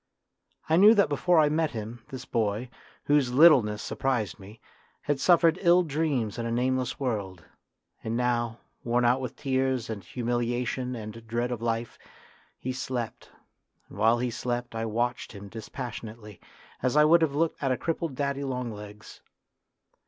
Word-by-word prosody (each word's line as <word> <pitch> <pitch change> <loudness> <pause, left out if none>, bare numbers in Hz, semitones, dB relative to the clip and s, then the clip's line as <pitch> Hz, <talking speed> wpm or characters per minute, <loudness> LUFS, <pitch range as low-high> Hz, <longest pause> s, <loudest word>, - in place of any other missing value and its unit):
I 160 +1 +3
knew 210 +5 +8
that 200 -7 +4
before 170 +5 +2
I 155 -1 +6
met 155 +1 +1
him, 110 +2 -7
this 130 -3 -8
boy, 110 +2 -1 0.3
whose 145 -4 +2
littleness 125 -8 +5
surprised 115 -8 -2
me, 100 +3 -13 0.4
had 145 -2 -1
suffered 170 +2 +4
ill 175 -1 +5
dreams 140 - -1
in 115 - -2
a - - -3
nameless 130 +3 0
world, 100 - -3 0.6
and 115 +1 -2
now, 120 -2 -1 0.2
worn 120 +1 +1
out 125 +2 +3
with 125 - -5
tears 130 -4 -1
and 100 -3 -6
humiliation 120 +1 -2
and 110 0 -8
dread 120 +2 -1
of 120 -2 -4
life, 115 0 -2 0.6
he 130 - -4
slept, 125 -3 -5 0.6
and - - -12
while 115 +2 +4
he 125 0 -1
slept 120 0 -3
I 115 0 -2
watched 120 +2 -2
him 100 -1 -10
dispassionately, 110 -3 -8 0.4
as 130 +3 +1
I 150 - +7
would 165 +2 +6
have 150 -3 +1
looked 165 +2 0
at 135 -2 +1
a 130 - +1
crippled 165 -3 -3
daddy 140 0 -2
long 125 -3 -3
legs. 105 0 -11
125 Hz, 160 wpm, -27 LUFS, 115-140 Hz, 0.6 s, knew